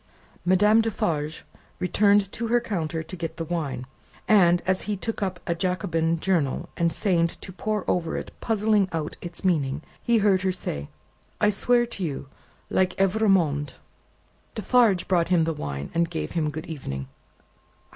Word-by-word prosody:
Madame 210 +5 +5
Defarge 160 -8 -2 0.3
returned 200 +1 +3
to 230 +1 -3
her 240 +1 +3
counter 165 -8 -3
to 165 +4 -8
get 165 -2 -5
the 165 - -3
wine, 155 -6 -3 0.4
and, 175 -5 +5
as 185 +1 +1
he 205 - 0
took 225 +3 -4
up 185 -2 -2
a 170 - 0
Jacobin 170 -2 0
journal 160 -7 0
and 170 -1 +1
feigned 170 -4 0
to - - -7
pore 210 +1 -2
over 165 -2 0
it - - -6
puzzling 215 -3 +2
out 155 -2 -3
its 175 +1 -7
meaning, 150 -4 +1 0.2
he 235 -1 +3
heard 200 -3 +3
her 190 0 +1
say, 75 - -5 0.5
"I 210 0 +4
swear 240 +4 +3
to 230 -5 -6
you, 140 -4 -4 0.4
like 185 -1 +1
Evrémonde!" 190 -8 +2 0.8
Defarge 230 -8 +3
brought 175 -3 +2
him 175 -3 +4
the 165 0 0
wine, 70 - -5
and 170 0 +1
gave 75 -1 -4
him 155 -3 0
Good 155 +2 -6
Evening. 70 - -5
180 Hz, 160 wpm, -25 LUFS, 160-200 Hz, 0.8 s, Madame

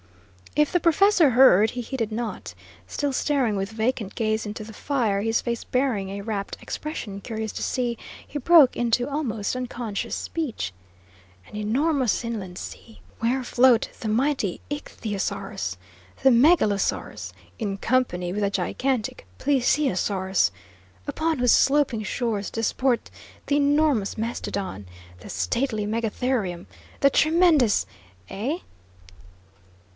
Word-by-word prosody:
If 300 0 +3
the 355 - +4
professor 345 -1 +4
heard, 230 -4 +6
he 250 - -4
heeded 230 -2 -3
not. 225 0 -5 0.3
Still 285 -2 -2
staring 260 -6 +1
with 195 0 -2
vacant 220 -2 -2
gaze 220 -1 0
into 215 +1 -6
the 220 +1 -10
fire, 225 -6 0
his 225 +2 +1
face 235 -1 -3
bearing 250 -7 0
a 200 +1 -5
rapt 200 -1 -4
expression 215 -10 -6
curious 220 0 -4
to - - -4
see, 240 -2 -1 0.3
he 295 - -5
broke 300 -2 +6
into 240 +1 +1
almost 250 -8 -2
unconscious 240 -4 -4
speech: 245 - -3 0.7
"An - - -12
enormous 250 +3 +1
inland 195 -6 -5
sea! 225 - -9 0.2
Where 250 +3 0
float 245 -1 +4
the 220 - -3
mighty 240 -4 0
ichthyosaurus, 205 - -4 0.5
the 265 - +7
megalosaurus, 210 - +2 0.3
in 200 -2 -2
company 195 -7 0
with 210 - -2
the 200 - +2
gigantic 255 +3 -2
plesiosaurus! 225 -8 +1 0.6
Upon 315 +2 0
whose 245 -2 +3
sloping 275 -6 +3
shores 215 -3 -2
disport 240 +2 0 0.4
the 285 - +1
enormous 290 -7 +2
mastodon, 200 - -4 0.3
the - - -11
stately 210 - -1
megatherium, 220 -4 -1 0.4
the 275 - +5
tremendous 310 - +4 0.4
eh?" 255 - -2
235 Hz, 120 wpm, -25 LUFS, 205-270 Hz, 0.7 s, the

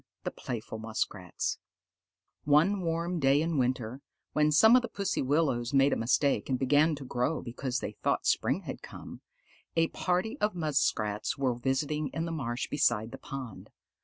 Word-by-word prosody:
THE - - -2
PLAYFUL 110 -2 -6
MUSKRATS 105 -4 -3 0.9
One 165 +8 +4
warm 170 +1 -1
day 135 0 +4
in 160 -2 0
winter, 125 0 -1 0.3
when 150 0 +3
some 220 +10 +7
of 255 - +6
the 240 - -4
pussy 200 -3 -2
willows 135 -3 +1
made 135 +1 +5
a - - +2
mistake 135 +6 +1
and 130 - +1
began 145 +4 +3
to 140 -1 -9
grow 125 +5 -1
because 125 +1 -3
they - - -3
thought - - 0
spring - - +1
had - - -7
come, - - -10 0.5
a 165 0 +3
party 185 +8 -1
of 210 -2 0
Muskrats 125 -10 0
were 135 -2 +1
visiting 140 +5 -1
in 165 - -1
the 165 - -4
marsh 125 -6 -3
beside 115 -6 +1
the - - -9
pond. 130 -6 -8
140 Hz, 165 wpm, -30 LUFS, 125-165 Hz, 0.9 s, some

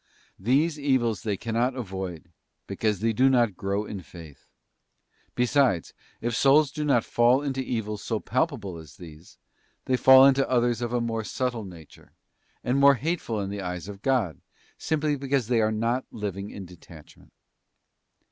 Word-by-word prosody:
These 145 - +1
evils 125 -8 +1
they 105 -3 -2
cannot 120 +4 -1
avoid, 95 -7 -6 0.3
because 105 -3 -2
they 115 0 +1
do 130 +4 +4
not 120 -6 +2
grow 100 +3 -2
in 100 -3 -7
faith. 80 -5 -14 0.9
Besides, 125 - +1 0.3
if 120 -1 -2
souls 140 +3 +4
do 150 +1 -4
not 135 -6 +2
fall 120 +4 +3
into 135 -2 -2
evils 110 -4 -4
so 110 -2 -2
palpable 120 - -2
as 80 +4 -14
these, 80 -3 -13 0.5
they 130 - +1
fall 130 +1 +8
into 135 0 +3
others 120 -2 +1
of 120 -1 -2
a 120 -1 0
more 115 -1 -2
subtle 120 -1 -3
nature, 85 -5 -14 0.5
and 130 +3 +1
more 140 0 +7
hateful 140 -6 -2
in 100 0 -4
the 100 0 -5
eyes 90 0 -5
of 100 -1 -9
God, 115 - 0 0.3
simply 155 -1 -1
because 135 -4 -1
they 120 -2 +3
are 110 0 +1
not 115 +4 -1
living 100 -2 -5
in 100 - -8
detachment. 85 -3 -16
115 Hz, 160 wpm, -26 LUFS, 100-130 Hz, 0.9 s, fall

